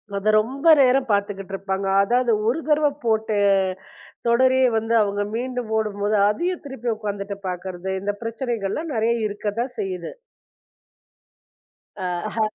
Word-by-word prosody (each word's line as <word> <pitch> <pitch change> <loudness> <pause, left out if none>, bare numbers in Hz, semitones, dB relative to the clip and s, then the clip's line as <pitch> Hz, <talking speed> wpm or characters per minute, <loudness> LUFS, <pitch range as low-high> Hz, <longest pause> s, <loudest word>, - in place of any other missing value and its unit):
அதை 200 +2 0
ரொம்ப 275 +8 -4
நேரம் 260 -1 +3
பார்த்துக்கிட்டு 200 -1 -1
இருப்பாங்க 195 0 -3 0.2
அதாவது 245 +2 +2 0.2
ஒரு 250 +7 +1
தடவ 300 -1 +3 0.2
போட்ட 220 -1 +1 1.0
தொடரையே 260 +2 +4
வந்து 225 +1 -1
அவங்க 205 0 0
மீண்டும் 250 -1 -3
போடும்போது 210 -1 0
அதையும் 345 +10 -2
திருப்பி 255 -4 -4
உட்கார்ந்துட்டு 200 -2 -5
பார்க்கிறது 180 +1 -5
இந்த 205 +1 -1
பிரச்சனைகள் 230 -3 -3
எல்லாம் 315 +4 -3
நறைய 225 +1 +2
இருக்கத்தான் 215 +5 -3
செய்யுது. 185 -4 -4 2.2
ஆஹா. 220 +1 -2
220 Hz, 120 wpm, -23 LUFS, 200-250 Hz, 2.2 s, தொடரையே